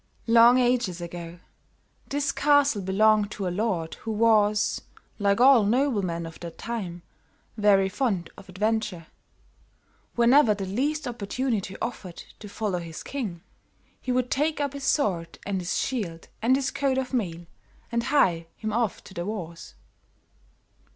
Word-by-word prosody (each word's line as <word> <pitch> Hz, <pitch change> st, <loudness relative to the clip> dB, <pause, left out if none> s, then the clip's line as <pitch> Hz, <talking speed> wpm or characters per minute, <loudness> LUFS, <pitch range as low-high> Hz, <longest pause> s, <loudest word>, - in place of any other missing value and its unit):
"Long 235 Hz, +2 st, +6 dB
ages 245 Hz, -8 st, +1 dB
ago, 170 Hz, 0 st, -7 dB, 0.7 s
this 280 Hz, 0 st, 0 dB
castle 285 Hz, -7 st, +3 dB
belonged 205 Hz, +2 st, +3 dB
to 195 Hz, -3 st, -3 dB
a 175 Hz, -, -2 dB
lord 185 Hz, -6 st, -1 dB
who -, -, -6 dB
was, 215 Hz, -1 st, +2 dB, 0.4 s
like 200 Hz, 0 st, +2 dB
all 255 Hz, -2 st, +7 dB
noblemen 205 Hz, -8 st, 0 dB
of 165 Hz, -1 st, -10 dB
that 170 Hz, -1 st, -8 dB
time, 185 Hz, -7 st, -5 dB, 0.5 s
very 205 Hz, -3 st, +4 dB
fond 190 Hz, -5 st, -1 dB
of 195 Hz, -, -14 dB
adventure. 210 Hz, -2 st, -1 dB, 1.1 s
Whenever 240 Hz, -1 st, +5 dB
the 195 Hz, -1 st, -4 dB
least 280 Hz, +9 st, -1 dB
opportunity 225 Hz, -3 st, -2 dB
offered 195 Hz, -7 st, -5 dB, 0.2 s
to 210 Hz, -, -9 dB
follow 200 Hz, -4 st, -2 dB
his 165 Hz, -2 st, -8 dB
king, 205 Hz, -12 st, -5 dB, 0.6 s
he 255 Hz, -, -3 dB
would 250 Hz, 0 st, 0 dB
take 300 Hz, +3 st, 0 dB
up 285 Hz, -2 st, -1 dB
his 280 Hz, -1 st, -6 dB
sword 175 Hz, -, 0 dB
and 195 Hz, -2 st, -2 dB
his 175 Hz, -, -2 dB
shield 190 Hz, -11 st, -3 dB
and 245 Hz, +4 st, +4 dB
his 270 Hz, 0 st, -1 dB
coat 275 Hz, -2 st, 0 dB
of 265 Hz, 0 st, -3 dB
mail, 175 Hz, -8 st, -2 dB, 0.5 s
and 235 Hz, 0 st, 0 dB
hie 180 Hz, -, +2 dB
him 215 Hz, -1 st, -4 dB
off 230 Hz, -3 st, -1 dB
to -, -, -13 dB
the 175 Hz, -, -4 dB
wars. 170 Hz, -, -6 dB
215 Hz, 145 wpm, -26 LUFS, 185-250 Hz, 1.1 s, all